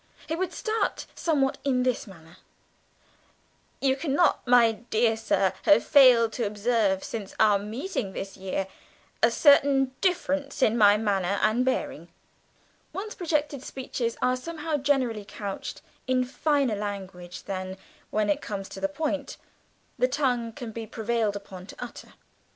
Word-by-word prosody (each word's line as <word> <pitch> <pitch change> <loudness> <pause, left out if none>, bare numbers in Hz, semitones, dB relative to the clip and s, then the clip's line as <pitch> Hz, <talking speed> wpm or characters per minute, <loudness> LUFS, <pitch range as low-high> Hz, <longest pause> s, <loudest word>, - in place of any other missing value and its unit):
He 320 - -2
would 370 +2 -2
start 440 0 -2
somewhat 280 -5 0
in 255 -3 +1
this 250 -2 -1
manner: 165 -4 -15 1.4
"You 265 -1 +3
cannot, 285 +3 +2
my 240 -2 +6
dear 225 +1 0
sir, 215 -4 +1
have 200 +3 +5
failed 245 -5 +6
to 235 -4 -1
observe 205 -2 +1
since 210 -4 -6
our 210 -2 +5
meeting 220 - -4
this 195 +1 -6
year, 190 0 -3 0.6
a 230 - +6
certain 275 0 +4
difference 285 -7 0
in 225 - +4
my 205 -2 +6
manner 200 -3 0
and 220 +4 +3
bearing" 260 0 -2 0.9
one's 420 +2 -5
projected 300 -6 -1
speeches 250 -3 -4
are 255 0 +3
somehow 315 +3 -3
generally 260 -6 0
couched 200 0 -6 0.2
in 255 0 +2
finer 275 -1 +1
language 190 -4 -6
than, 185 0 -5 0.3
when 215 0 0
it 200 - +1
comes 195 -2 -5
to - - -8
the 195 - +1
point, 285 +4 -3 0.6
the 250 - +4
tongue 250 -4 0
can 235 -1 -7
be 225 0 -6
prevailed 225 -2 -1
upon 190 -2 -9
to - - -10
utter. 245 -1 -9
235 Hz, 145 wpm, -27 LUFS, 205-275 Hz, 1.4 s, my